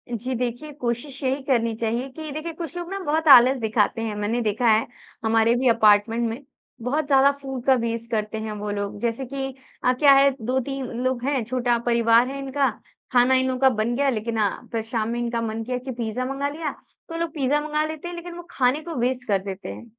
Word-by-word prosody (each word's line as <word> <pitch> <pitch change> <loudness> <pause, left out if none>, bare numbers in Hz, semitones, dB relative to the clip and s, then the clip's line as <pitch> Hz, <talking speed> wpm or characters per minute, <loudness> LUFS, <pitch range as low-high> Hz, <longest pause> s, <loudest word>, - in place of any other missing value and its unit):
जी 250 +3 -3
देखिए, 250 +5 -3
कोशिश 260 +1 -4
यही 265 +2 0
करनी 230 -4 +1
चाहिए 235 +4 -2
कि 310 +2 -8
देखिए, 310 +3 -5
कुछ 330 0 -7
लोग 345 0 -5
ना 390 - -3
बहुत 315 0 0
आलस 260 -1 +8
दिखाते 220 0 +1
हैं। 220 -2 -3
मैंने 210 +4 -1
देखा 220 +2 0
है 220 0 +4 0.4
हमारे 225 +1 +3
भी 255 +1 +1
अपार्टमेंट 225 +1 +4
में 225 +3 -5 0.4
बहुत 285 +5 -1
ज़्यादा 275 0 +5
फूड 265 -3 -5
का 265 - +6
वेस्ट 230 -1 -3
करते 215 0 -2
हैं 220 0 -4
वो 205 0 -4
लोग। 205 0 -4
जैसे 235 +3 -1
कि 270 +1 -4 0.4
अ, 250 - +5
क्या 280 +2 +5
है, 275 +1 +6
2-3 265 +3 -2 0.2
लोग 255 -1 -1
हैं, 270 -3 0
छोटा 240 0 0
परिवार 235 0 +4
है 275 +1 -5
इनका, 275 -1 0 0.4
खाना 250 +1 +4
इन 260 0 +2
लोगों 255 -1 -2
का 265 -1 +6
बन 235 0 -1
गया 280 +1 +2
लेकिन 225 -1 -2
अ, 205 -2 +3 0.2
फ़िर 225 -1 -1
शाम 225 0 -2
में 240 +1 -2
इनका 235 -1 -1
मन 225 0 -3
किया 250 +2 -2
कि 255 +1 -6
पिज़्ज़ा 235 0 -3
मँगा 280 +1 -1
लिया 300 -1 -4 0.4
तो 330 - -5
लोग 335 -2 -3
पिज़्ज़ा 290 0 +1
मँगा 305 0 -1
लेते 315 +2 -6
हैं 350 - -6
लेकिन 345 0 -8
वो 345 - -8
खाने 260 +4 +1
को 335 -3 -6
वेस्ट 250 +1 -1
कर 200 -2 +2
देते 195 0 -6
हैं। - - -11
250 Hz, 225 wpm, -24 LUFS, 230-275 Hz, 0.4 s, आलस